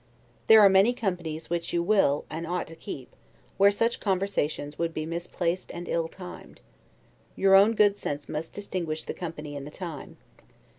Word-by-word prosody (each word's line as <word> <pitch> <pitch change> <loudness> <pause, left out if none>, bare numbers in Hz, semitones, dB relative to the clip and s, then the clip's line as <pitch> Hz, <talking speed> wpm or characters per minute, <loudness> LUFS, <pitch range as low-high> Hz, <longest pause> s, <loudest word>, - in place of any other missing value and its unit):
There 220 -1 +9
are 205 - +9
many 195 +5 +5
companies 175 -8 -4
which 170 -1 -2
you 170 0 +1
will, 175 -7 +2
and 165 +1 -5
ought 180 +1 -2
to 165 - -10
keep, 145 -7 -9 0.4
where 200 0 +7
such 230 +3 0
conversations 185 -7 -1
would 165 -1 -1
be 155 - -2
misplaced 170 +1 -3
and 175 0 -6
ill 165 -1 0
timed; 180 +1 -11 0.8
your 195 0 +3
own 200 +4 +6
good 205 -1 +4
sense 145 0 -4
must 155 +2 -5
distinguish 175 -6 -4
the - - -5
company 155 -4 -6
and 140 0 -6
the - - -7
time. 165 -3 -8
175 Hz, 170 wpm, -27 LUFS, 160-195 Hz, 0.8 s, There